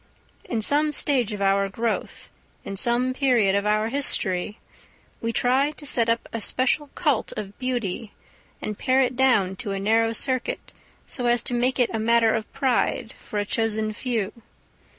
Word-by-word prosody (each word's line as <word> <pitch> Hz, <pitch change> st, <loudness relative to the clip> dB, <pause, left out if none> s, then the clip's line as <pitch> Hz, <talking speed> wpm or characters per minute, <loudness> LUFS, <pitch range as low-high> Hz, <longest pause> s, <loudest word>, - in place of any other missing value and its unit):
In 225 Hz, -3 st, -2 dB
some 300 Hz, +5 st, +2 dB
stage 260 Hz, -6 st, +2 dB
of 205 Hz, -1 st, -3 dB
our 195 Hz, 0 st, +2 dB
growth, 225 Hz, +3 st, -3 dB, 0.3 s
in 195 Hz, -, -5 dB
some 240 Hz, +5 st, +1 dB
period 245 Hz, -8 st, +3 dB
of 200 Hz, +1 st, +1 dB
our 215 Hz, +1 st, +2 dB
history, 210 Hz, -7 st, -1 dB, 0.6 s
we 230 Hz, -, -1 dB
try 255 Hz, +5 st, +2 dB
to 300 Hz, -, -9 dB
set 235 Hz, -4 st, +2 dB
up 230 Hz, 0 st, 0 dB
a 230 Hz, -, -3 dB
special 260 Hz, +6 st, 0 dB
cult 295 Hz, -9 st, +1 dB
of 200 Hz, -1 st, -6 dB
beauty, 235 Hz, -5 st, -2 dB, 0.5 s
and 210 Hz, -1 st, -4 dB
pare 260 Hz, +1 st, +3 dB
it 250 Hz, 0 st, -1 dB
down 240 Hz, -8 st, +3 dB
to 210 Hz, -5 st, -3 dB
a 195 Hz, -, -3 dB
narrow 225 Hz, +3 st, +2 dB
circuit, 255 Hz, +2 st, -2 dB, 0.3 s
so 245 Hz, -2 st, -2 dB
as 240 Hz, 0 st, +2 dB
to 250 Hz, -, -2 dB
make 245 Hz, +2 st, +1 dB
it 245 Hz, -2 st, +2 dB
a 225 Hz, -, -1 dB
matter 230 Hz, 0 st, +3 dB
of 220 Hz, -1 st, -3 dB
pride 260 Hz, -3 st, 0 dB
for 215 Hz, -, -8 dB
a 205 Hz, -, 0 dB
chosen 220 Hz, 0 st, 0 dB
few. 220 Hz, -3 st, -2 dB
230 Hz, 170 wpm, -24 LUFS, 210-255 Hz, 0.6 s, period